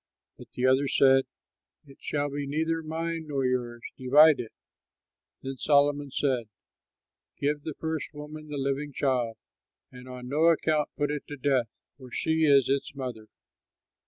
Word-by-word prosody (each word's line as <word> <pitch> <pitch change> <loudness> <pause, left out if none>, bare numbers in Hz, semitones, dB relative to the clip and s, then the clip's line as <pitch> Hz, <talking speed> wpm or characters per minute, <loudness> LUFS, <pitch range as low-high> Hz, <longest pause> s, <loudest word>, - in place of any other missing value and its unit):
But - - -14
the 125 - -1
other 130 +2 +3
said, 135 0 +4 0.6
"It 135 -1 -16
shall 145 -1 -2
be 145 0 -4
neither 160 +3 -1
mine 165 0 -4
nor 140 -3 -1
yours! 120 -2 -2 0.2
Divide 150 +4 +6
it!" 115 - -6 0.9
Then 135 0 -5
Solomon 145 0 +2
said, 130 -4 -1 0.9
"Give 145 +1 -1
the 155 -1 -6
first 160 -1 -3
woman 155 +1 -9
the 150 -1 -5
living 140 +1 -2
child, 125 -5 0 0.5
and 125 0 -12
on 125 -1 -8
no 150 +5 +2
account 155 -2 +2
put 145 0 0
it 150 -1 -5
to 145 - -7
death; 130 -3 +1 0.5
she 160 +2 +1
is 140 -3 +5
its 135 +1 -1
mother." 125 -5 -6
140 Hz, 150 wpm, -27 LUFS, 130-150 Hz, 0.9 s, Divide